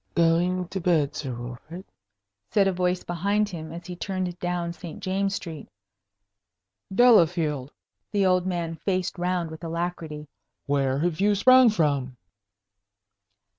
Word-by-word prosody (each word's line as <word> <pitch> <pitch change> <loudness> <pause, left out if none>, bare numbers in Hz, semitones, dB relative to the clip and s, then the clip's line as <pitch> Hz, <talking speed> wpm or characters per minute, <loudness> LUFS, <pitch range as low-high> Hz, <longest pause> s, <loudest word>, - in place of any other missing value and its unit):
"Going 175 +2 +2
to 190 - -3
bed, 155 -5 +1
Sir 135 -3 -4
Wilfrid?" 125 +10 -8 0.6
said 200 -2 +3
a - - +3
voice 180 0 0
behind 200 +5 0
him, 160 -4 -7
as 170 +1 -8
he 180 - -6
turned 185 -1 -3
down 175 -1 -2
St. 170 -2 -9
James's 195 +1 -1
Street. 160 -4 -7 1.2
"Delafield!" 170 - +4 0.4
The 200 -2 +2
old 185 0 +2
man 170 -3 -2
faced 185 -1 -2
round 175 -2 -1
with 160 +2 -10
alacrity. 165 -2 -4 0.4
"Where 135 -2 +1
have 165 +3 -1
you 205 +1 +4
sprung 255 +4 +7
from?" 140 - 0
175 Hz, 135 wpm, -25 LUFS, 160-185 Hz, 1.2 s, sprung